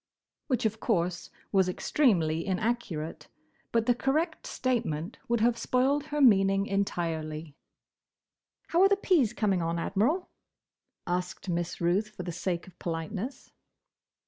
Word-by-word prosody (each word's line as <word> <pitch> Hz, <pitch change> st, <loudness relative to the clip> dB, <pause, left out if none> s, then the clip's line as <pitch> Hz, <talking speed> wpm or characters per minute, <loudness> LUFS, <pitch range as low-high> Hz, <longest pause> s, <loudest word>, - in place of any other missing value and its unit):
Which, 255 Hz, -5 st, 0 dB
of 220 Hz, 0 st, 0 dB
course 175 Hz, -5 st, 0 dB, 0.2 s
was 190 Hz, -2 st, +3 dB
extremely 170 Hz, -, +2 dB
inaccurate, 195 Hz, -5 st, -2 dB, 0.4 s
but 230 Hz, -1 st, +2 dB
the 245 Hz, -, +4 dB
correct 310 Hz, +7 st, -1 dB
statement 220 Hz, -9 st, -2 dB
would 235 Hz, -1 st, +1 dB
have 235 Hz, 0 st, +3 dB
spoiled 275 Hz, +3 st, +1 dB
her 295 Hz, -1 st, -3 dB
meaning 195 Hz, -6 st, +5 dB
entirely. 165 Hz, -6 st, -2 dB, 1.2 s
"How 340 Hz, -, +3 dB
are 390 Hz, -, +7 dB
the 400 Hz, -, +5 dB
peas 330 Hz, -, +3 dB
coming 205 Hz, -6 st, +1 dB
on, 165 Hz, +1 st, -1 dB
Admiral?" 235 Hz, -, 0 dB, 0.7 s
asked 180 Hz, +1 st, -3 dB
Miss 175 Hz, 0 st, -2 dB
Ruth, 185 Hz, +5 st, +1 dB
for 200 Hz, -4 st, -8 dB
the 175 Hz, -, -4 dB
sake 175 Hz, 0 st, -2 dB
of 185 Hz, -2 st, -17 dB
politeness. 185 Hz, -, -4 dB
200 Hz, 130 wpm, -29 LUFS, 175-245 Hz, 1.2 s, are